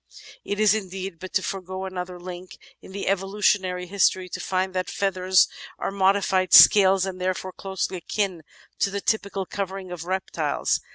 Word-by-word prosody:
It 205 - -4
is 215 -1 +5
indeed 190 -4 -5
but 185 - -8
to 190 - +1
forge 185 -2 -5 0.2
another 180 -1 -6
link 180 0 -9 0.2
in - - -13
that 200 - -5
evolutionary 195 -1 0
history 185 -1 +1
to - - -6
find 185 0 -1
that 185 0 -2
feathers 185 -2 +2 0.3
are - - -3
modified 190 -1 +2
scales 195 -2 +8
and 185 -1 -6
therefore 185 0 -2
closely 190 -1 -4
akin 185 0 -2 0.4
to - - +2
the 200 +1 -3
typical 200 -3 -1
covering 190 -1 -5
of 170 -2 -6
reptiles. 190 +1 -1
190 Hz, 160 wpm, -24 LUFS, 185-195 Hz, 0.4 s, scales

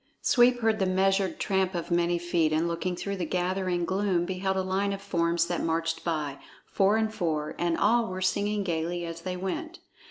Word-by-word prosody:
Sweep 245 0 +4
heard 225 -1 +2
the 190 - +2
measured 190 0 +1
tramp 190 -1 0
of 170 +1 -4
many 175 0 +2
feet, 170 -2 +1
and 160 +2 +1
looking 175 +2 -2
through 200 +2 -4
the 180 - -2
gathering 180 0 -1
gloom, 190 -2 0
beheld 190 +1 -1
a 190 - +1
line 195 +2 0
of 195 - -5
forms 170 -3 +1
that 175 0 -2
marched 165 0 -1
by, 150 -4 -2 0.3
four 200 +2 +2
and 220 0 0
four, 155 -7 -2
and 170 -1 +1
all 235 0 +3
were 185 0 -5
singing 205 +2 0
gayly 170 0 -2
as 165 0 -6
they 180 +1 -4
went. 315 - -4
185 Hz, 195 wpm, -28 LUFS, 170-195 Hz, 0.3 s, Sweep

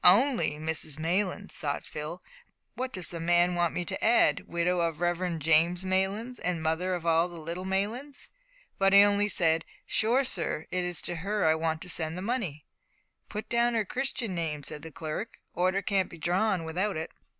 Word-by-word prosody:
"Only 235 - +6
Mrs 155 -1 -2
Maylands!" 185 +5 -1
thought 145 -2 -3
Phil; 155 +4 -6 0.7
"does 185 -4 -1
the 170 - -5
man 175 +1 +3
want 175 -1 +1
me 175 - -3
to - - -3
add 235 +2 +4
`widow 175 +1 +1
of 165 -1 0
the - - -14
Reverend 175 -2 -1
James 165 +3 +4
Maylands, 195 +6 -1
and 175 -3 -2
mother 170 +4 0
of 170 -2 -6
all 165 +1 +3
the 170 -1 -9
little 170 +4 -5
Maylands?'" 225 +9 -2 0.5
but 195 0 +4
he 200 0 +9
only 205 0 +3
said, 165 -4 +3 0.2
"Sure, 240 +5 +2
sir, 170 -8 -1
it's 180 -2 -1
to 175 - -4
her 200 +3 -1
I 160 - +5
want 160 0 -1
to - - -8
send 160 -1 +2
the 185 - -5
money." 195 - -2 0.6
"Put 210 +1 -5
down 235 0 +2
her 220 -2 +1
Christian 250 -3 -2
name;" 160 -4 -2
said 150 - -6
the 160 - -8
clerk; 155 +9 -5 0.2
"order 185 +3 +1
can't 195 -2 +1
be 170 - -11
drawn 180 +3 +1
without 180 +4 -1
it." 160 +1 -4
180 Hz, 185 wpm, -29 LUFS, 165-200 Hz, 0.7 s, he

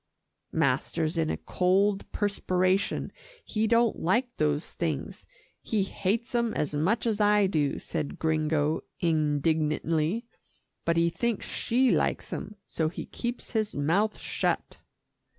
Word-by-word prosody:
"Master's 160 +1 +1
in 160 -1 +1
a - - -1
cold 195 +2 +1
perspiration; 190 -2 0 0.3
he 220 0 0
don't 235 0 +3
like 240 +8 +1
those 150 0 0
things 160 -4 -3 0.3
he 210 -3 0
hates 205 +6 -2
'em 235 -2 +1
as 150 - -1
much 180 +12 +1
as 220 -2 +1
I 210 0 +5
do," 150 -7 +1
said 145 - -4
Gringo 155 -1 +1 0.2
indignantly, 155 - +1 0.6
"but 165 0 +2
he 170 0 +3
thinks 235 +3 -1
she 255 +2 +2
likes - - 0
'em, 210 - -5
so 160 -1 -1
he 170 - -6
keeps 240 0 -5
his 215 -2 -1
mouth 180 +9 +1
shut." - - -2
185 Hz, 130 wpm, -28 LUFS, 155-215 Hz, 0.6 s, I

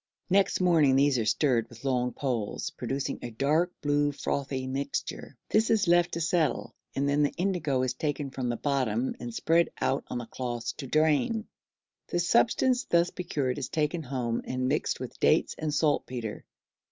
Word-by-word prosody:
Next 195 0 +3
morning 160 -7 +4
these 140 -2 +3
are 110 - 0
stirred 120 0 +2
with 120 +3 -13
long 125 -2 +1
poles, 120 -7 -3
producing 135 +1 -3
a 120 - -5
dark 150 +9 +1
blue 145 0 +2
frothy 135 -2 -3
mixture; 135 0 -4
this 220 +1 +3
is 215 -4 +3
left 175 0 +4
to 170 - -2
settle, 165 -1 0 0.2
and 140 +1 +1
then 140 +1 +2
the 145 - +3
indigo 165 -8 0
is 130 -1 0
taken 145 0 -3
from 130 -2 -3
the 120 - -1
bottom 130 -4 0
and 120 -1 -5
spread 165 +8 +2
out 135 - 0
on 120 -1 -4
cloths 120 -2 -3
to 135 - -6
drain; 160 - +2 0.6
the - - -2
substance 235 +7 +3
thus 170 0 +2
procured 145 -7 -2
is 135 - -4
taken 155 +2 0
home 125 -5 -2
and 130 0 -2
mixed 145 +3 0
with - - -7
dates - - +3
and 155 -1 -1
saltpetre. 130 -7 -1
140 Hz, 170 wpm, -28 LUFS, 130-165 Hz, 0.6 s, morning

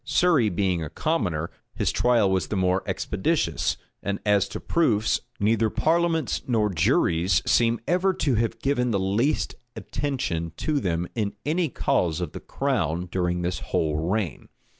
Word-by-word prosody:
Surrey 160 -11 +3
being 90 -3 0
a 75 - -5
commoner, 85 - -1 0.2
his - - 0
trial 115 -5 +3
was 95 -1 0
the - - -3
more 95 0 +2
expeditious; - - 0 0.2
and 100 0 -2
as 105 -1 +3
to - - -6
proofs, 115 -11 +1 0.2
neither 110 +1 +2
parliaments 165 +1 +1
nor 110 -4 +2
juries 85 +2 +2
seem 115 -1 +3
ever 185 +3 +2
to 150 -7 0
have 115 0 0
given 125 0 0
the 100 -4 +1
least 105 +10 0 0.2
attention 125 - -3
to 150 -2 0
them 85 -6 -1
in 105 -3 -2
any 165 +2 +1
cause 85 -8 0
of 85 -4 -3
the - - -7
crown 90 - -1
during 90 -1 -1
this 90 +1 -2
whole 75 -2 -1
reign. 95 - -2
105 Hz, 155 wpm, -25 LUFS, 90-135 Hz, 0.2 s, Surrey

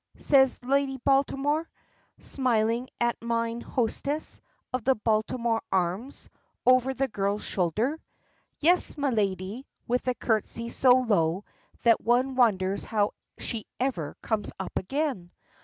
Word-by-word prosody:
says 265 -3 +5
Lady 270 +1 +1
Baltimore, 280 +4 +1 0.5
smiling 240 -1 0
at 240 0 0
mine 230 0 -1
hostess 280 +6 -2 0.3
of 255 -2 -1
the 265 +2 +3
Baltimore 225 +1 0
Arms, 190 +8 -1 0.4
over 255 +1 +5
the 270 +1 0
girl's 205 -2 -1
shoulder. 215 - 0 0.6
"Yes, 345 +2 +3
my 285 -2 0
lady," 200 +2 -2 0.2
with 250 +2 -1
a 250 - +1
curtsey 230 +1 -1
so 250 +1 +5
low 195 -5 +1 0.4
that 230 -1 +5
one 250 +3 +2
wonders 200 -6 +2
how 210 -2 0 0.3
she 225 -3 -5
ever 240 - -2
comes 220 -2 -1
up 190 - -6
again. 265 - -2
235 Hz, 125 wpm, -27 LUFS, 210-265 Hz, 0.6 s, says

